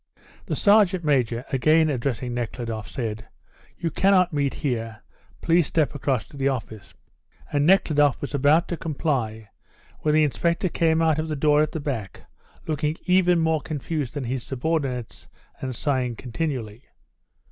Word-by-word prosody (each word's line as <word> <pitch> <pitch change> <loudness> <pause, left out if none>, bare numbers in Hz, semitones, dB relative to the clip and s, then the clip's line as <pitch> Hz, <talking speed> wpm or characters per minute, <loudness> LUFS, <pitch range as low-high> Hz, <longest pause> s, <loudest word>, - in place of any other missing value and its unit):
The - - -1
sergeant 200 -4 +4
major, 125 -5 +1
again 155 +5 +4
addressing 125 -1 -2
Nekhludoff, 115 -2 -4
said: 110 -3 -5 0.5
"You 165 - -2
cannot 185 -1 +3
meet 140 -2 0
here; 115 -6 -3 0.4
please 170 -2 +3
step 155 -4 +1
across 135 -5 -1
to 145 - -13
the 135 0 +1
office." 110 -7 -5 0.6
And 145 +1 +2
Nekhludoff 145 -7 +4
was 145 - -6
about 145 +5 +3
to 170 - -2
comply 125 -10 -2 0.5
when 150 0 +1
the 155 - +5
inspector 170 +5 0
came 165 -1 +2
out 160 -1 +2
of 155 - -2
the 155 - -2
door 150 +1 +3
at 155 - 0
the 160 - -3
back, 130 -9 -5 0.4
looking 150 0 -1
even 180 -1 +4
more 160 -1 +1
confused 150 -1 -4
than 145 - -3
his 125 +1 -3
subordinates, 135 -2 -3 0.3
and 130 -2 -4
sighing 130 -3 -1
continually. 125 -3 -4
145 Hz, 150 wpm, -24 LUFS, 125-160 Hz, 0.6 s, the